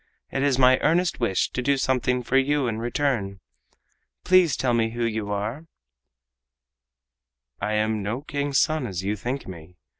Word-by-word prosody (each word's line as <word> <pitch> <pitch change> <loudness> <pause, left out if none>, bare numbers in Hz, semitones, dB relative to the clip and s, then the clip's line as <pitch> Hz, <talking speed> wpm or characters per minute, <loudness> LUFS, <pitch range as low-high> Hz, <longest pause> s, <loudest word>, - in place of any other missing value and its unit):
It 135 - -2
is 140 -2 +2
my 130 -1 +5
earnest 170 +2 +1
wish 95 -7 0
to 130 - -2
do 140 +2 +1
something 125 -1 0
for 125 - -2
you 140 +1 +2
in 110 -1 -2
return. 120 -5 -1 0.8
Please 180 -4 +4
tell 125 -2 0
me 115 -1 +2
who 120 0 -1
you 110 -2 -2
are?" 110 +10 -4 1.9
"I 105 - -1
am 110 0 0
no 110 +7 -3
King's 145 -2 -2
son 155 -5 +1
as 95 -3 -4
you 100 +2 -1
think 125 +6 -4
me. 90 -1 -11
125 Hz, 160 wpm, -24 LUFS, 105-140 Hz, 1.9 s, my